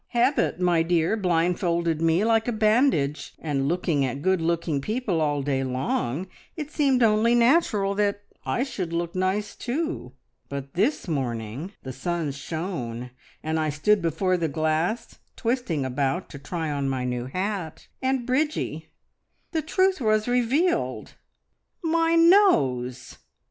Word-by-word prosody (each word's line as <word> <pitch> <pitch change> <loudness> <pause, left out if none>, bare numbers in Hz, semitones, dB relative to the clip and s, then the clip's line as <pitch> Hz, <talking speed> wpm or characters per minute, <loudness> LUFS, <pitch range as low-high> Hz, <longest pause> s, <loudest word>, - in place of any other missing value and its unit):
Habit, 250 -4 +2
my 175 -2 +3
dear, 165 +3 +2
blindfolded 170 -3 +1
me 165 +4 +3
like 225 0 +2
a - - +1
bandage, 215 - +1
and 140 -3 -1
looking 165 -3 +1
at 135 +2 -3
good 190 -1 +2
looking 165 -3 0
people 210 - -1
all 145 -2 0
day 135 -1 0
long 130 +3 -1 0.3
it 300 -1 -5
seemed 270 -5 +2
only 225 +2 +4
natural 235 -6 +3
that 205 0 0 0.2
I 245 - 0
should 190 -11 -4
look 170 0 -2
nice 190 +3 -1
too. 285 - -3 0.4
But 140 -1 -6
this 215 - 0
morning 130 - -3
the 130 - -6
sun 165 +3 -2
shone, 135 -6 -5 0.3
and 160 +1 -1
I 155 -1 0
stood 195 +8 +2
before 175 +3 +1
the 165 -2 0
glass 160 - -1 0.2
twisting 230 - -1
about 135 +7 -1
to 145 - -9
try 160 +2 -3
on 140 -1 -1
my 130 -2 -2
new 125 0 -2
hat, 185 +1 -4
and, 260 -2 0
Bridgie, 295 +5 -1 0.6
the 320 - 0
truth 375 +1 +1
was 215 -1 +2
revealed! 255 +9 +1 0.7
My 330 0 +2
nose!" 135 - +3
175 Hz, 140 wpm, -25 LUFS, 145-230 Hz, 0.7 s, only